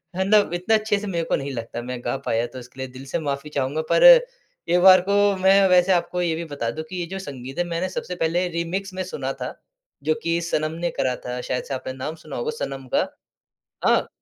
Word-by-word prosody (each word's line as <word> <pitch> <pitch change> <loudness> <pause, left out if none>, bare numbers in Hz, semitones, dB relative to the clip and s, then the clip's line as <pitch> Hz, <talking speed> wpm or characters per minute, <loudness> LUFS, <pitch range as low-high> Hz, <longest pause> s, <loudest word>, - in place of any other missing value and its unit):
है 190 - +1
ना, 215 - +7
अब 200 -4 +1
इतना 180 +5 +2
अच्छे 215 -1 +1
से 210 - -6
मेरे 170 -3 -1
को - - +1
नहीं 140 0 -4
लगता, 115 0 -5
मैं 125 0 -5
गा 120 +3 -1
पाया, 115 +1 +1
तो 130 +2 -9
इसके 125 +2 -14
लिए 130 - -3
दिल 135 - -9
से 135 - -2
माफ़ी 145 -1 -3
चाहूँगा। 145 +2 -1
पर - - +4 0.7
एक 175 +1 +4
बार 185 -1 +8
को 200 +1 +3
मैं 195 0 +6
वैसे 180 +1 +5
आपको 180 +1 0
ये 170 -2 +1
भी 170 - -4
बता 140 -6 -3
दूँ 155 - -5
कि 185 - -6
ये 175 - -2
जो 190 +2 -5
संगीत 135 -5 -8
है, - - +3
मैंने 175 +2 -2
सबसे 180 - -5
पहले 175 +2 0
रीमिक्स 180 +4 -3
में 185 0 -3
सुना 135 -7 -4
था, - - -6 0.5
जो 155 - +2
कि 170 0 +1
सनम 155 -2 -1
ने 175 0 0
करा 130 -1 -1
था। 125 0 -4
शायद 125 - -2
से 140 - -6
आपने 130 0 -4
नाम 145 +5 -5
सुना 160 - -10
होगा 465 -2 -2
सनम 135 - -5
का। - - +2 0.8
हाँ, - - +3
165 Hz, 245 wpm, -23 LUFS, 135-185 Hz, 0.8 s, बार